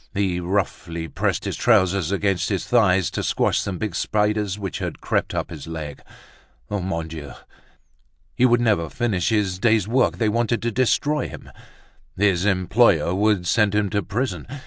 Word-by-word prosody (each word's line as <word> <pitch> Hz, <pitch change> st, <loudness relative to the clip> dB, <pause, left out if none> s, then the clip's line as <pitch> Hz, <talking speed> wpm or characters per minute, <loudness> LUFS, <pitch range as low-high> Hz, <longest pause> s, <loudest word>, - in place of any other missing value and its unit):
He 95 Hz, -3 st, 0 dB
roughly 85 Hz, -3 st, -2 dB
pressed -, -, -2 dB
his -, -, -2 dB
trousers 95 Hz, -6 st, +2 dB
against 100 Hz, -2 st, 0 dB
his 95 Hz, -4 st, -2 dB
thigh 105 Hz, -6 st, +4 dB
to 85 Hz, -, -3 dB
squash -, -, +1 dB
some 95 Hz, -3 st, -3 dB
big 105 Hz, -2 st, -3 dB
spiders 105 Hz, 0 st, 0 dB
which 100 Hz, -3 st, -5 dB
had -, -, -4 dB
crept -, -, -1 dB
up -, -, -3 dB
his 80 Hz, -2 st, -8 dB
leg. 75 Hz, -3 st, -6 dB, 0.7 s
Mon 90 Hz, -5 st, -2 dB
Dieu! 80 Hz, -3 st, -8 dB, 1.0 s
he 125 Hz, -, 0 dB
would 120 Hz, 0 st, +3 dB
never 105 Hz, -9 st, +1 dB
finish 105 Hz, -7 st, -1 dB
his 100 Hz, -4 st, 0 dB
day's 110 Hz, -2 st, +2 dB
work, 125 Hz, +2 st, +2 dB
they 115 Hz, -, +1 dB
wanted 115 Hz, +2 st, +1 dB
to 120 Hz, -, 0 dB
destroy 145 Hz, +5 st, +1 dB
him, -, -, -11 dB, 0.7 s
his 95 Hz, -2 st, +2 dB
employer 95 Hz, -3 st, +3 dB
would 100 Hz, -1 st, +1 dB
send 105 Hz, +1 st, +2 dB
him 105 Hz, -2 st, +1 dB
to 105 Hz, -1 st, +1 dB
prison. 115 Hz, +8 st, -3 dB
100 Hz, 165 wpm, -22 LUFS, 90-110 Hz, 1.0 s, thigh